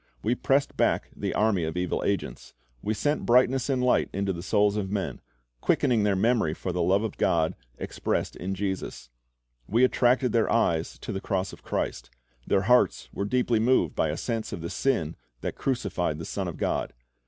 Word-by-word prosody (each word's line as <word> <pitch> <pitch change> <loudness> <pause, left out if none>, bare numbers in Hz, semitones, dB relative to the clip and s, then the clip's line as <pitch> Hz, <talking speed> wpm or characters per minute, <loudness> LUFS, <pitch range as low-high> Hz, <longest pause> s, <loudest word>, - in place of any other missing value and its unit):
We 115 - +2
pressed 135 +3 +1
back - - +1
the - - -3
army 105 -5 +2
of 80 +2 -3
evil 90 0 -1
angels. 100 -11 -3 0.3
We 110 - -1
sent 145 +8 0
brightness 125 +2 +3
and 130 -2 +1
light 125 - +3
into 100 0 -1
the 85 - -6
souls 100 +3 +2
of 100 -3 -2
men, 100 -1 -3 0.4
quickening 120 -3 +2
their 105 -1 +2
memory 110 -5 +2
of 90 +2 -4
the 90 - 0
love 95 +5 +3
of 110 - -4
God 80 -1 +2 0.2
expressed - - -2
in 95 +2 -4
Jesus. 95 -10 -4 0.6
We 115 +5 +3
attracted 125 0 +3
their 115 -2 +2
eyes 85 -8 +1
to - - -5
the 95 -2 -3
cross 95 -1 -2
of - - -12
Christ. - - -3 0.4
Their 95 - +3
hearts 125 +4 +3
were 100 - -2
deeply 120 0 +1
moved 125 +4 +2
by 80 - +1
a 75 - -2
sense 115 -2 -3
of - - -5
the 85 - -5
sin 85 - 0 0.2
that - - -3
crucified 95 - -1
the 80 - -6
Son - - -3
of - - -5
God. - - -1
105 Hz, 190 wpm, -27 LUFS, 90-120 Hz, 0.6 s, brightness